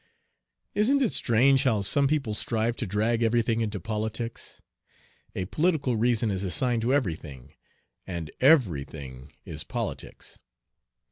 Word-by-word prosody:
Isn't 270 +7 +3
it 235 - +1
strange 130 +3 +3
how 115 -7 +1
some 140 +8 +3
people 140 -7 0
strive 115 +2 0
to 120 - -3
drag 110 +4 0
everything 115 0 +2
into 105 -2 -2
politics! 110 +3 -4 0.8
A 95 - -2
political 150 - +1
reason 115 -1 +1
is 95 0 -2
assigned 115 +5 0
to 120 +3 0
every 130 - +2
thing, 70 -2 -12 0.5
and 85 -4 -5
"every 125 - +4
thing 65 -2 -10
is - - -6
politics." - - -6
115 Hz, 135 wpm, -27 LUFS, 95-130 Hz, 0.8 s, every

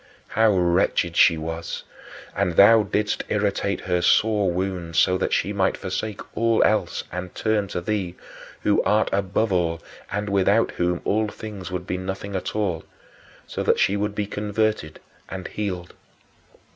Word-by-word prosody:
How 110 +1 +3
wretched 85 -1 +2
she 85 -1 +6
was! 80 +1 -5 0.5
And 95 -3 0
thou 110 +4 +8
didst 105 +1 -1
irritate 100 -1 0
her 90 0 0
sore 105 +2 +3
wound 90 -2 -3
so 90 +4 +4
that - - -1
she 105 - 0
might 95 -2 +1
forsake 105 +2 -4
all 115 -1 +3
else 110 0 +1
and 90 +1 -6
turn 110 -2 0
to 90 - -4
thee 95 -2 -2 0.5
who 105 - +3
art 105 +1 +2
above 100 +2 0
all 85 -2 +1 0.3
and 105 +2 -2
without 100 +3 +2
whom 90 0 -1
all 110 +1 +1
things 105 -3 -8
would 90 -1 -4
be 90 - -2
nothing 95 +1 -5
at 95 - -3
all 90 -7 -1 0.6
so - - -5
that - - +2
she 95 - +3
should 100 0 -1
be 105 - -1
converted 105 -5 -2 0.3
and 95 -1 -6
healed. 90 -4 -4
100 Hz, 160 wpm, -23 LUFS, 90-105 Hz, 0.6 s, thou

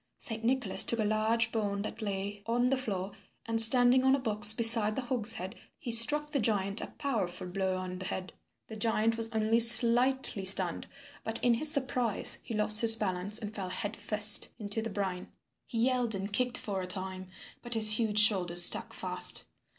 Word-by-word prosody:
Saint 225 -1 -8
Nicholas 245 -4 0
took 235 - -2
a 220 - -3
large 220 +2 -2
bone 200 -3 -5
that 220 - -9
lay 200 0 -8
on 245 +2 -2
the - - 0
floor, 200 -6 -7 0.3
and 225 0 +2
standing 245 +2 +4
on 265 +1 +1
a - - -5
box 210 -4 +1
beside 225 -1 +2
the 265 - -6
hogshead 225 -6 -2 0.2
he 240 - -9
struck 295 +6 +4
the 285 - -3
giant 205 -2 0
a - - -7
powerful 220 -14 -5
blow 185 +1 -5
on 185 0 -9
the 190 - -9
head. 185 0 -8 0.3
The 220 - -13
giant 225 +1 -3
was 225 0 -4
only 220 0 -2
slightly 240 -1 +4
stunned, 190 +1 0 0.4
but 225 0 -3
in 245 - +1
his 300 +7 -2
surprise 255 -6 -1
he 230 - -10
lost 210 0 +6
his 225 -1 +7
balance, 200 -1 -2
and 215 -2 -4
fell 195 -3 -8
head 205 +3 -7
first 210 0 +6
into 210 +1 -6
the 225 - -8
brine. 190 -3 -7 0.4
He 230 -1 -4
yelled 250 -4 -3
and 195 +1 -8
kicked 250 +3 -2
for 195 -3 -7
a 180 - -9
time, 185 0 -6 0.3
but 240 -1 -7
his 215 0 +5
huge 215 -2 -4
shoulders 180 -5 +3
stuck - - +3
fast. - - -2
220 Hz, 190 wpm, -27 LUFS, 200-235 Hz, 0.4 s, his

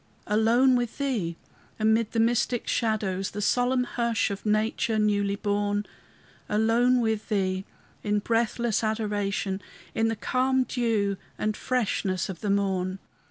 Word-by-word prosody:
Alone 230 +5 +4
with 240 -2 -1
Thee, 220 -13 -1 0.4
amid 220 0 +2
the 230 - -1
mystic 240 +1 +1
shadows, 200 -4 0
The 205 - -6
solemn 250 +4 +2
hush 235 -3 0
of 200 +2 -5
nature 220 +2 +1
newly 205 -1 +1
born; 205 0 -1 0.6
Alone 235 +4 +3
with 220 -1 -1
Thee 190 -2 0 0.4
in 210 0 0
breathless 230 +1 0
adoration, 205 -3 -1 0.3
In 225 - +1
the 225 - 0
calm 260 +3 +1
dew 225 -5 0 0.2
and 215 0 -1
freshness 200 -8 -1
of 180 -3 -6
the 210 - -2
morn. 190 -2 0
215 Hz, 130 wpm, -27 LUFS, 200-235 Hz, 0.6 s, Alone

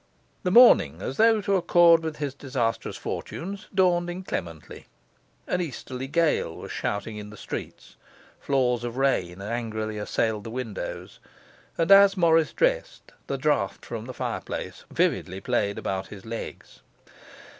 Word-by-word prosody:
The 185 - 0
morning, 180 - +6
as 130 - -5
though 225 -1 +5
to 200 0 +2
accord 170 -2 +5
with 160 -2 -4
his 145 -3 -3
disastrous 125 -5 -2
fortunes, 195 +3 -6
dawned 175 -2 +2
inclemently. 90 - -6 0.6
An 180 - -1
easterly 130 -4 -5
gale 155 - +1
was - - -8
shouting 105 +1 -3
in 105 0 -8
the 105 - -12
streets; - - -8 0.4
flaws 125 -3 +1
of 120 +1 -5
rain 95 -9 0
angrily 110 -1 -3
assailed 105 0 -1
the 115 - -7
windows; 115 -4 -6 0.6
and 165 +2 +1
as 195 0 +8
Morris 165 -3 +4
dressed, - - -1 0.2
the 140 - -2
draught 145 +1 0
from 115 -2 -6
the 130 - -7
fireplace - - -5
vividly 95 +1 0
played 100 -3 -1
about 95 0 -3
his 100 -2 -11
legs. 115 0 -8
130 Hz, 140 wpm, -26 LUFS, 110-175 Hz, 0.6 s, as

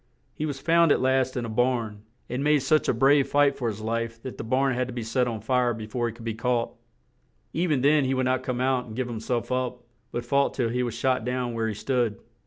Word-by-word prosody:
He 155 - -3
was 140 -2 -4
found 165 +1 +4
at - - +4
last 130 0 +1
in 120 - -2
a - - -4
barn, 115 -2 0 0.3
and 125 +3 -3
made 150 -2 +3
such 155 +3 +2
a - - +6
brave 135 +4 +4
fight 145 -1 +3
for 120 - -3
his 110 -1 -4
life 115 +1 -2
that 130 - -7
the - - -3
barn 130 +4 +1
had 125 0 -1
to 125 - -7
be 120 - -3
set 125 +3 0
on 110 -3 -4
fire 125 +1 +1
be 110 -1 -6
fore 120 +2 -2
he 115 - -4
could 115 0 -11
be 115 - -1
caught; 120 +1 -1 0.8
e 175 +3 0
ven 145 -6 +1
then 145 +1 +4
he 130 +1 0
would 130 0 0
not 130 0 +1
come 125 -1 -3
out 130 -1 +1
and 110 - -9
give 130 0 -2
him 115 -2 -5
self 120 +2 -2
up; 125 -1 -2 0.3
but 120 0 -4
fought 140 +3 +1
till 120 -4 0
he 125 +2 -1
was 120 -2 -2
shot 125 0 +1
down 125 0 -2
where 115 -1 -1
he 110 - -3
stood. 120 -2 -1
125 Hz, 265 wpm, -26 LUFS, 115-130 Hz, 0.8 s, a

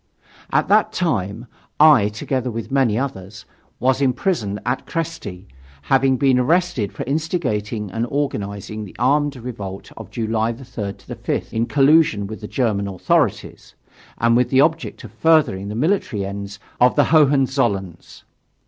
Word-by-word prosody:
At - - +2
that 210 +1 +3
time 115 - -2 0.3
I, 150 -9 +7
together 125 +4 -3
with 115 0 -6
many 130 -6 +2
others, 100 -7 -5 0.3
was 130 +2 +1
imprisoned 125 - 0
at 125 +2 -2
Kresty, 130 - -5 0.4
having 135 - +3
been 130 -1 +3
arrested 160 - +1
for - - -6
instigating 125 - -2
and 115 +4 -2
organizing 105 -6 -3
the 100 - -11
armed 145 +4 +2
revolt 105 -6 -7
of - - -10
July 110 0 -1
3 115 -5 -6
5, - - -5
in 115 +1 0
collusion 140 -7 +4
with 110 +2 -8
the 105 - -6
German 105 -6 -1
authorities, 95 -2 -1 0.4
and 115 +1 +3
with 125 0 +2
the 135 0 +4
object 160 +2 0
of - - -10
furthering 155 -12 +2
the 105 - -5
military 130 - 0
ends 100 0 -6 0.2
of 125 0 +4
the - - +5
Hohenzollerns. 130 - +1
120 Hz, 140 wpm, -20 LUFS, 105-140 Hz, 0.4 s, I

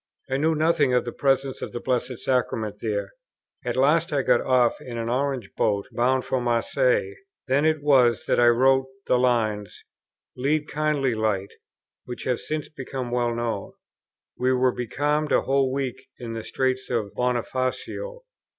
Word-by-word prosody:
I 135 - +2
knew 160 +3 +2
nothing 155 -4 +2
of 125 - +2
the 120 - -3
Presence 135 -1 0
of - - -5
the 120 - -3
Blessed 125 0 -1
Sacrament 110 -5 -1
there. 105 -2 -2 0.5
At - - -2
last 150 +6 +3
I 140 -2 +1
got - - +3
off 125 -2 +2
in 120 -2 -7
an 115 0 -3
orange 130 -3 -1
boat, 100 -1 0
bound 130 +2 +1
for 130 - -1
Marseilles. 415 - +1 0.3
Then 140 +3 +2
it 155 -2 +1
was 125 -6 +4
that - - +1
I 120 - +6
wrote 130 +2 +4 0.2
the 125 - +3
lines, 110 -5 0 0.5
"Lead, 145 +4 0
kindly 150 -4 0
light," 105 -3 -1 0.5
which 125 - -7
have 125 -2 0
since 155 -1 -4
become 130 -4 -6
well 120 -1 0
known. 115 -4 -3 0.7
We 130 +1 +2
were 130 0 +3
becalmed 145 +5 -1
a - - +4
whole 135 -1 +1
week 130 -1 -3
in 120 -2 -6
the 115 -1 -5
Straits 130 0 -1
of 110 -5 -2
Bonifacio. 130 - -2
130 Hz, 165 wpm, -25 LUFS, 120-140 Hz, 0.7 s, I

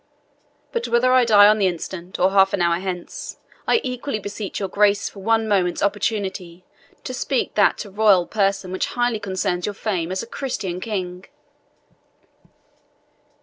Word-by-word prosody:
But 470 -1 -2
whether 255 +2 +3
I 255 -1 +5
die 205 -3 +7
on 215 +1 +4
the 195 - +3
instant, 175 +1 -5
or 185 +1 +3
half 195 -1 +4
an 195 - 0
hour 170 0 +2
hence, 180 -2 -6 0.3
I - - +4
equally 250 -1 -3
beseech 205 -1 -6
your 195 - -2
Grace 200 +1 +2
for 200 - -10
one 225 +2 +1
moment's 185 -4 +1
opportunity 195 -4 -2 0.4
to 255 - -5
speak 255 0 -1
that 205 - +3
to 205 - -6
your - - -19
royal 205 -5 +5
person 195 -2 -1
which 185 - -1
highly 240 -2 +1
concerns 185 -2 -2
your 205 - -4
fame 185 -6 -2
as 185 - -2
a - - -7
Christian 215 -8 -4
king." 185 -3 -4
200 Hz, 165 wpm, -22 LUFS, 185-220 Hz, 0.4 s, die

